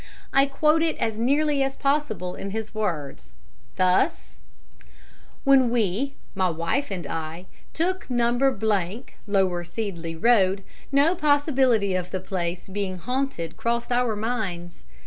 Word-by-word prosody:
I 275 Hz, +1 st, +5 dB
quote 305 Hz, +3 st, +3 dB
it 325 Hz, -1 st, 0 dB
as 220 Hz, -1 st, -2 dB
nearly 285 Hz, +4 st, +2 dB
as 270 Hz, 0 st, 0 dB
possible 275 Hz, -, -1 dB
in 200 Hz, -, -6 dB
his 220 Hz, +2 st, -5 dB
words, 150 Hz, -, -4 dB, 0.4 s
thus: 180 Hz, -, +2 dB, 1.1 s
"When 270 Hz, -3 st, +5 dB
we 235 Hz, +4 st, 0 dB, 0.2 s
my 190 Hz, -2 st, +1 dB
wife 170 Hz, -, -1 dB
and 180 Hz, -5 st, -4 dB
I 160 Hz, +4 st, -5 dB, 0.3 s
took 365 Hz, +1 st, -1 dB
No. 240 Hz, -1 st, +2 dB, 1.0 s
Lower 190 Hz, -3 st, +1 dB
Seedley 175 Hz, -3 st, -4 dB
Road, 195 Hz, -1 st, +3 dB, 0.3 s
no 285 Hz, +5 st, +4 dB
possibility 275 Hz, -, +2 dB
of 180 Hz, -1 st, -2 dB
the 185 Hz, -, -3 dB
place 180 Hz, -1 st, -4 dB
being 195 Hz, -1 st, -3 dB
haunted 250 Hz, -6 st, -3 dB
crossed 235 Hz, +1 st, -1 dB
our 245 Hz, -2 st, +2 dB
minds. 205 Hz, -6 st, -3 dB
215 Hz, 125 wpm, -25 LUFS, 180-270 Hz, 1.1 s, I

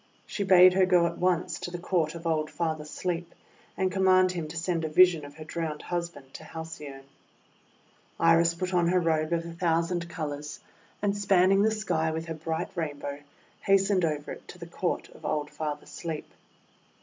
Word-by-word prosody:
She 205 Hz, -, -3 dB
bade 185 Hz, -1 st, +7 dB
her 185 Hz, 0 st, +4 dB
go 180 Hz, -2 st, +4 dB
at 170 Hz, -, -3 dB
once 180 Hz, -1 st, 0 dB
to -, -, -5 dB
the 175 Hz, -, -5 dB
Court 170 Hz, -3 st, 0 dB
of 170 Hz, 0 st, -9 dB
old 155 Hz, -2 st, 0 dB
Father 160 Hz, -3 st, -2 dB
Sleep, 170 Hz, +2 st, -4 dB, 0.4 s
and 185 Hz, 0 st, +1 dB
com 190 Hz, 0 st, 0 dB
mand 185 Hz, 0 st, +5 dB
him 170 Hz, -3 st, -4 dB
to 160 Hz, +2 st, -7 dB
send 165 Hz, 0 st, -1 dB
a 160 Hz, -, -1 dB
vision 170 Hz, 0 st, +5 dB
of 145 Hz, 0 st, -10 dB
her 155 Hz, -, -9 dB
drowned 160 Hz, -1 st, -4 dB
hus 175 Hz, -1 st, -2 dB
band 140 Hz, -5 st, -16 dB
to -, -, -9 dB
Halcyone. 150 Hz, -4 st, -8 dB, 1.2 s
Iris 165 Hz, 0 st, +4 dB
put 185 Hz, +2 st, -3 dB
on 175 Hz, -1 st, +3 dB
her 180 Hz, +1 st, +3 dB
robe 160 Hz, -2 st, 0 dB
of 170 Hz, -1 st, 0 dB
a 170 Hz, -, -7 dB
thousand 170 Hz, 0 st, 0 dB
colours, 150 Hz, -3 st, -5 dB, 0.4 s
and, 200 Hz, -1 st, +1 dB
spanning 195 Hz, -1 st, +4 dB
the 215 Hz, -, +4 dB
sky 180 Hz, -7 st, 0 dB
with 160 Hz, +1 st, -3 dB
her 165 Hz, -, -4 dB
bright 160 Hz, +1 st, -3 dB
Rainbow, 145 Hz, -4 st, -4 dB, 0.4 s
hastened 195 Hz, -1 st, +3 dB
over 150 Hz, -2 st, -1 dB
it -, -, -10 dB
to -, -, -11 dB
the 170 Hz, -, -8 dB
Court 170 Hz, +1 st, -2 dB
of -, -, -17 dB
old 150 Hz, -1 st, -2 dB
Father 150 Hz, -2 st, -4 dB
Sleep. 160 Hz, -3 st, -6 dB
170 Hz, 195 wpm, -28 LUFS, 155-180 Hz, 1.2 s, bade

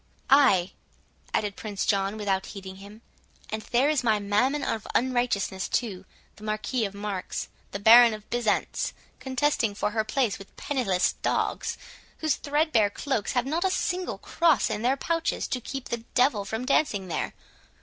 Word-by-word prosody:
"Ay!" 225 Hz, -11 st, +5 dB, 0.6 s
added 205 Hz, -2 st, -1 dB
Prince 205 Hz, -3 st, -4 dB
John, 200 Hz, +1 st, +1 dB
without 195 Hz, -2 st, -1 dB
heeding 190 Hz, -2 st, -8 dB
him, 205 Hz, +3 st, -13 dB, 0.5 s
"and 220 Hz, 0 st, -2 dB
there 240 Hz, +5 st, +2 dB
is 300 Hz, -3 st, +1 dB
my 220 Hz, -3 st, +3 dB
Mammon 210 Hz, +8 st, +1 dB
of 220 Hz, -2 st, -2 dB
unrighteousness 240 Hz, -7 st, 0 dB
too—the 205 Hz, -1 st, -5 dB
Marquis 215 Hz, +3 st, -1 dB
of 200 Hz, 0 st, -6 dB
Marks, 200 Hz, -2 st, -4 dB, 0.2 s
the -, -, -4 dB
Baron 230 Hz, +3 st, +8 dB
of 215 Hz, -1 st, -13 dB
Byzants, 240 Hz, -3 st, 0 dB, 0.3 s
contesting 260 Hz, -4 st, 0 dB
for 215 Hz, +1 st, 0 dB
place 225 Hz, -1 st, 0 dB
with 195 Hz, -, -14 dB
penniless 215 Hz, -10 st, 0 dB
dogs, -, -, -1 dB, 0.4 s
whose 310 Hz, -3 st, +1 dB
threadbare 290 Hz, -8 st, +2 dB
cloaks 225 Hz, -1 st, -2 dB
have 245 Hz, -, +1 dB
not 320 Hz, +6 st, -1 dB
a 380 Hz, -, +3 dB
single 365 Hz, 0 st, -1 dB
cross 325 Hz, -9 st, +2 dB
in 210 Hz, -, -2 dB
their 255 Hz, +4 st, +2 dB
pouches 330 Hz, +3 st, -1 dB
to 250 Hz, -, -2 dB
keep 270 Hz, +2 st, -6 dB
the 235 Hz, -, -1 dB, 0.2 s
devil 245 Hz, -5 st, +3 dB
from 220 Hz, +5 st, -3 dB
dancing 240 Hz, -8 st, +1 dB
there. 170 Hz, -, -3 dB
220 Hz, 155 wpm, -27 LUFS, 200-265 Hz, 0.6 s, Baron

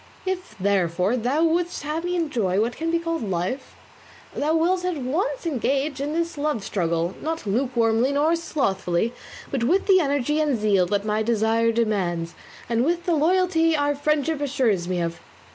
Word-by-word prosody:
If, 370 Hz, -1 st, -4 dB
therefore, 185 Hz, +1 st, +1 dB
thou 255 Hz, +7 st, +1 dB
wouldst 340 Hz, +1 st, 0 dB
have 310 Hz, +3 st, -3 dB
me 355 Hz, 0 st, -1 dB
enjoy 235 Hz, -, 0 dB
what 230 Hz, +3 st, 0 dB
can 325 Hz, +1 st, -2 dB
be 335 Hz, -, +2 dB
called 330 Hz, -1 st, -2 dB
life, 190 Hz, +6 st, -3 dB, 0.6 s
thou 310 Hz, +2 st, 0 dB
wilt 355 Hz, +3 st, +2 dB
at 360 Hz, -3 st, -1 dB
once 335 Hz, -, -2 dB
engage 275 Hz, -1 st, -1 dB
in 290 Hz, +1 st, -2 dB
this 335 Hz, -2 st, -2 dB
love 290 Hz, -8 st, -1 dB
struggle, 170 Hz, -2 st, -1 dB
not 325 Hz, -2 st, -3 dB
lukewarmly 235 Hz, +2 st, +1 dB
nor 300 Hz, +4 st, +2 dB
slothfully, 220 Hz, -, -1 dB, 0.4 s
but 265 Hz, -4 st, -1 dB
with 355 Hz, +11 st, +2 dB
the 385 Hz, -2 st, +5 dB
energy 285 Hz, -1 st, +1 dB
and 290 Hz, -5 st, +1 dB
zeal 200 Hz, -4 st, +2 dB
that 205 Hz, +2 st, -1 dB
my 215 Hz, 0 st, 0 dB
desire 225 Hz, +1 st, +2 dB
demands, 185 Hz, -7 st, -1 dB, 0.3 s
and 235 Hz, 0 st, +1 dB
with 345 Hz, +4 st, 0 dB
the 345 Hz, -, +2 dB
loyalty 330 Hz, 0 st, +3 dB
our 290 Hz, 0 st, +1 dB
friendship 300 Hz, +1 st, 0 dB
assures 240 Hz, -11 st, +1 dB
me 180 Hz, -1 st, -1 dB
of." 170 Hz, -1 st, -3 dB
275 Hz, 170 wpm, -24 LUFS, 210-325 Hz, 0.6 s, the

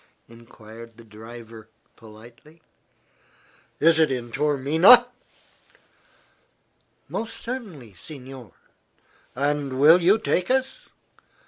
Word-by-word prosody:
enquired 115 Hz, -1 st, -15 dB
the 115 Hz, -, -15 dB
driver, 115 Hz, 0 st, -13 dB, 0.3 s
politely. 115 Hz, +8 st, -17 dB, 1.2 s
"Is 160 Hz, +1 st, +3 dB
it 155 Hz, -3 st, +2 dB
in 120 Hz, -2 st, -5 dB
Taormina?" 150 Hz, -, +4 dB, 2.0 s
"Most 230 Hz, 0 st, -6 dB
certainly, 195 Hz, -, -8 dB
signore." 130 Hz, -, -12 dB, 0.8 s
"And 140 Hz, 0 st, -2 dB
you -, -, -5 dB
will 170 Hz, +8 st, +5 dB
take 185 Hz, -4 st, -2 dB
us?" 265 Hz, 0 st, -2 dB
135 Hz, 85 wpm, -23 LUFS, 115-165 Hz, 2.0 s, will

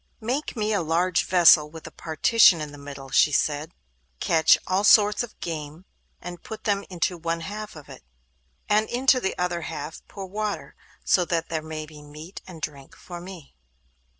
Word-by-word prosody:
'Make 255 Hz, +7 st, -3 dB
me 215 Hz, -1 st, -1 dB
a 200 Hz, -, +1 dB
large 170 Hz, +2 st, +1 dB
vessel 170 Hz, -4 st, +6 dB
with 160 Hz, +1 st, -11 dB
a 160 Hz, -, -8 dB
partition 170 Hz, +4 st, +4 dB
in 150 Hz, -1 st, -5 dB
the 145 Hz, -, -12 dB
middle,' 140 Hz, -1 st, -10 dB
she 150 Hz, -, +4 dB
said; 150 Hz, +2 st, 0 dB, 0.5 s
'catch 160 Hz, -1 st, +4 dB
all 185 Hz, +2 st, 0 dB
sorts 210 Hz, +1 st, +5 dB
of 240 Hz, -2 st, -8 dB
game, 155 Hz, +1 st, -6 dB, 0.3 s
and 175 Hz, 0 st, -8 dB
put 220 Hz, -, -9 dB
them 200 Hz, -2 st, 0 dB
into 180 Hz, -1 st, -2 dB
one 165 Hz, 0 st, -2 dB
half 210 Hz, +4 st, -7 dB
of 150 Hz, -2 st, -12 dB
it, -, -, -12 dB, 0.6 s
and 215 Hz, +1 st, +2 dB
into 255 Hz, +1 st, +3 dB
the 190 Hz, -, -3 dB
other 175 Hz, -1 st, -1 dB
half 160 Hz, 0 st, -6 dB
pour 195 Hz, -2 st, -8 dB
water; 210 Hz, +2 st, -4 dB, 0.3 s
so 180 Hz, -, +4 dB
that 165 Hz, -1 st, -2 dB
there 160 Hz, -1 st, -2 dB
may 155 Hz, 0 st, -6 dB
be 150 Hz, -1 st, -13 dB
meat 150 Hz, +5 st, -11 dB
and 165 Hz, -4 st, -11 dB
drink 140 Hz, -3 st, -7 dB
for 175 Hz, -1 st, -9 dB
me. 180 Hz, -5 st, -11 dB
170 Hz, 180 wpm, -25 LUFS, 155-200 Hz, 0.6 s, vessel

